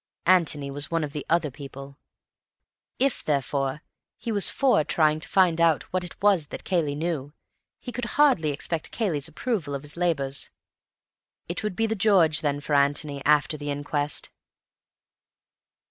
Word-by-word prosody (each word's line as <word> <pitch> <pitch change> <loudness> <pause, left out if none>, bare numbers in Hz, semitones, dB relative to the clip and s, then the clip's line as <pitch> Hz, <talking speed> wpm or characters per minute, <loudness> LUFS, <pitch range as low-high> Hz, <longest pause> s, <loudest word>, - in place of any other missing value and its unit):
Antony 160 -6 +2
was 145 +1 -1
one 165 -1 0
of 145 -1 -5
the 150 - -4
"other 165 -3 +2
people"; 140 0 -10 1.0
if, 270 -1 +1
therefore, 140 0 -1 0.3
he 230 +1 -4
was 205 -2 +4
for 260 - +3
trying 155 0 +2
to 160 - -7
find 175 -4 +3
out 165 -3 +3
what 185 -1 0
it 175 - -8
was 190 -7 +3
that - - -8
Cayley 165 -6 0
knew, 150 -3 -3 0.5
he 245 - -7
could 245 0 -4
hardly 265 - +4
expect 155 +3 -3
Cayley's 165 -10 -2
approval 160 - -3
of 140 - -6
his 145 0 -7
labours. 140 -6 0 1.0
It 175 - -3
would 210 -4 -3
be 225 - +1
'The 220 0 -2
George,' 180 -7 +4
then, 145 -2 0
for 150 - -3
Antony 140 0 +1
after 150 +1 +3
the 145 0 -5
inquest. 145 +1 -2
155 Hz, 160 wpm, -25 LUFS, 145-180 Hz, 1.0 s, was